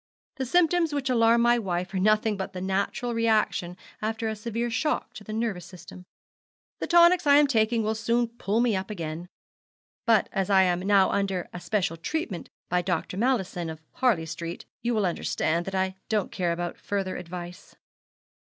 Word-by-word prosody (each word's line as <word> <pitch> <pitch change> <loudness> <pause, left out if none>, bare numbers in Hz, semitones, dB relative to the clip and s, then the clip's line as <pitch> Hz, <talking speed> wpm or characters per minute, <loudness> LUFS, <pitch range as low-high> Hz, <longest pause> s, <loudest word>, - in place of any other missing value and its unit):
The 265 -2 -2
symptoms 340 +1 +3
which 275 -2 -1
alarm 230 -1 +4
my 240 0 +4
wife 180 -3 -3
are 190 - 0
nothing 215 +2 +3
but 190 0 -5
the 185 - -5
natural 195 +6 -1
reaction 215 -6 +1 0.2
after 225 +1 -2
a 220 - -2
severe 230 +2 -3
shock 245 0 -1
to 240 - -10
the 215 - -8
nervous 215 -6 -2
system. 180 0 -12 0.7
The - - -3
tonics 345 -1 +5
I 285 - +7
am 295 +1 +7
taking 225 -3 +2
will 215 +1 0
soon 230 +2 +1
pull 225 -1 -1
me 240 -4 +2
up 190 +2 -3
again; 170 -3 -5 0.8
but 225 -3 +4
as 195 -1 -1
I 190 -1 +6
am 180 -1 +1
now 195 0 +3
under 195 -3 -1
a 175 - -5
special 190 -3 -1
treatment 195 - -4 0.2
by 180 0 +1
Dr. 180 0 -2
Mallison, 190 -7 0
of 160 -1 -7
Harley 230 -11 +1
Street, 170 +1 -6 0.2
you 240 0 0
will 210 -2 +2
under, 175 - -2
stand 170 +2 0
that 195 - -3
I 190 0 0
don't 215 -3 0
care 180 -3 -1
about 175 +1 -4
further 195 -2 -2
advice.' 175 0 -8
205 Hz, 185 wpm, -26 LUFS, 180-235 Hz, 0.8 s, I